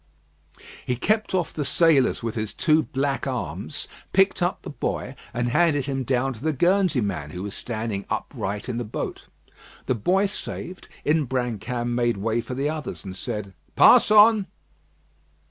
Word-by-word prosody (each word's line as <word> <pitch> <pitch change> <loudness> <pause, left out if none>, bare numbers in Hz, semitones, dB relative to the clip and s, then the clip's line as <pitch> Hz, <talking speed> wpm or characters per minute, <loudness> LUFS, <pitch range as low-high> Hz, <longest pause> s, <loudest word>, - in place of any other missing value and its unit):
He 125 - -1
kept 215 - 0
off 180 -2 -1
the 150 - -2
sailors 145 -4 +3
with 115 -2 -2
his 110 -2 -4
two 155 0 +3
black 140 -1 -2
arms, 110 - -4 0.3
picked 195 0 +3
up 175 +1 0
the - - -6
boy, 135 -2 -3 0.2
and 120 0 -1
handed 145 -1 +2
him 135 -1 -2
down 130 +1 0
to 115 +2 -12
the 160 - +2
Guernsey 175 -1 +2
man, 90 -9 -3
who 90 +4 -6
was 105 0 -5
standing 110 -4 -4
upright 100 +2 -3
in 120 -2 -2
the - - -2
boat. 105 - -5 0.6
The - - +1
boy 180 - +2
saved, 185 -2 -6 0.2
Imbrancam 125 -5 -1
made 120 -2 +1
way 115 +3 0
for 125 +2 -6
the 140 +3 0
others, 150 - -5
and 95 -1 -6
said: 100 0 -5 0.2
"Pass - - +7
on!" 210 -1 +6
130 Hz, 165 wpm, -24 LUFS, 110-160 Hz, 0.6 s, Pass